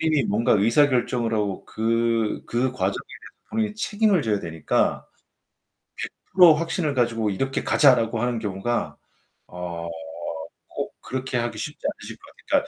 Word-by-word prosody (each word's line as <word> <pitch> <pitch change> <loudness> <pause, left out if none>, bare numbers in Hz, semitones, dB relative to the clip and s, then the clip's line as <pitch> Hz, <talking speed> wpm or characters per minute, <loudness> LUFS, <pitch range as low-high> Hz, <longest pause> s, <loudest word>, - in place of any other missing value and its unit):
본인이 155 -4 +2
뭔가 110 +3 +2
의사결정을 120 +1 +3
하고, 105 -3 -1
그 115 0 0
그 125 +2 0
과정에 100 -6 -1 0.2
대해서 - - -12 0.2
본인이 215 -1 -1
책임을 210 -5 +2
져야 105 -2 +1
되니까. 80 -3 0 1.0
100% 180 -3 +5
확신을 165 -1 -1
가지고 115 -4 +1
"이렇게 135 +8 -2
가자."라고 120 -5 +4
하는 120 -1 0
경우가 105 +3 -2 0.5
어 85 -1 -6 0.8
꼭 - - -5
그렇게 130 -1 -3
하기 120 0 -2
쉽지 150 - -5
않으실 - - -6
것 - - -34 0.3
같아요. - - +2
120 Hz, 310 characters per minute, -24 LUFS, 105-145 Hz, 1.0 s, 100